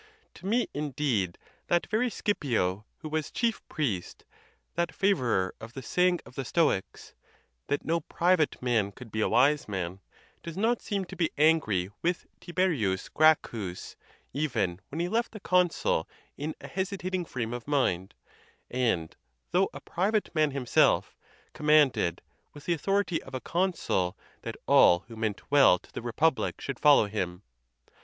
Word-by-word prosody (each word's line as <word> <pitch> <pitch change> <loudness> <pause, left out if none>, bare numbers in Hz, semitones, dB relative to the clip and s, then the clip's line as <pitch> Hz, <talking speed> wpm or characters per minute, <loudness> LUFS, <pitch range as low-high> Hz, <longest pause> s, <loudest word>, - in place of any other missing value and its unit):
To 185 - -9
me, 235 +4 +2
indeed, 135 - -1 0.3
that 175 0 +2
very 225 +5 +1
Scipio' 115 - -1 0.2
who 155 - -6
was 155 -1 -2
chief 235 -2 -1
priest, 110 - -3 0.5
that 170 +1 -1
favorer 125 - +1
of 115 +1 -9
the 135 - -7
saying 180 +6 +2
of - - -14
the 135 - -4
Stoics, 145 - 0 0.5
"That 145 - -1
no 165 +1 +1
private 170 0 +1
man 110 -5 +1
could 120 0 -12
be 110 - -1
a - - +2
wise 140 +6 +3
man," 95 -2 -4 0.4
does 170 0 -8
not 230 +4 +1
seem 200 -3 -2
to - - -10
be 165 -3 +1
angry 140 - +3
with 175 +1 -1
Tiberius 160 - 0
Gracchus, 115 - +1 0.4
even 115 - -1
when 155 - -5
he 175 - 0
left 230 +5 -1
the 215 - -7
consul 180 - +1 0.3
in 155 +2 -4
a - - -9
hesitating 190 -1 -2
frame 120 -6 -4
of 120 0 -6
mind, 100 -11 0 0.6
and, 115 -11 0 0.4
though - - +3
a - - -9
private 205 +4 -1
man 155 -2 +3
himself, 135 -4 +2 0.4
commanded, 150 - +3 0.3
with 145 - -12
the 175 - +2
au - - -2
thority 195 +1 0
of - - -10
a - - -2
consul, 170 - -1 0.2
that - - -6
all 85 0 +6
who 115 +3 -13
meant 110 +1 -4
well 140 -10 +7
to - - -21
the - - -5
repub 125 +6 +1
lic - - -3
should 140 -3 -5
follow 145 -6 +6
him. 95 -3 -4
145 Hz, 160 wpm, -28 LUFS, 110-175 Hz, 0.6 s, well